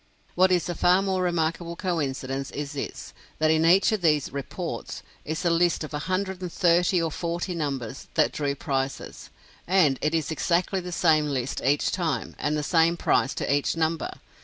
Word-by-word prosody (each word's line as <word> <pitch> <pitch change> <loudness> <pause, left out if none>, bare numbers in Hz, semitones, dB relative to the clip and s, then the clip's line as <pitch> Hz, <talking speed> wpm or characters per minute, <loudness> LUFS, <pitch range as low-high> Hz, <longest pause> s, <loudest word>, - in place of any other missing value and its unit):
What 185 +1 +4
is 180 -2 +2
a 175 - -2
far 180 +3 +3
more 190 -1 0
remarkable 170 -1 -1
coincidence 135 -7 -2
is 145 0 -5
this; 145 -2 -6 0.2
that 155 0 +3
in 160 0 +3
each 190 +5 +5
of 215 -3 -1
these 150 -5 +2
"reports" 140 -1 -5 0.2
is 155 +3 -3
a 170 - +3
list 170 -1 +2
of 155 - -8
a 145 - -2
hundred 190 0 -1
and 180 -2 -4
thirty 175 0 +3
or 165 -1 -1
forty 170 +3 -3
numbers 135 -6 -4
that 155 - +3
drew 140 -2 -2
prizes, 135 -1 -4 0.4
and 170 -7 +3
it 155 +2 +1
is 160 -1 -1
exactly 175 +4 0
the 180 0 -6
same 155 -3 +3
list 135 -2 -2
each 140 +3 +2
time, 160 -10 -2
and 150 +1 0
the 150 - -2
same 165 +2 +3
prize 135 - +1
to - - 0
each 145 +3 -1
number! 160 0 0
165 Hz, 185 wpm, -26 LUFS, 145-175 Hz, 0.4 s, each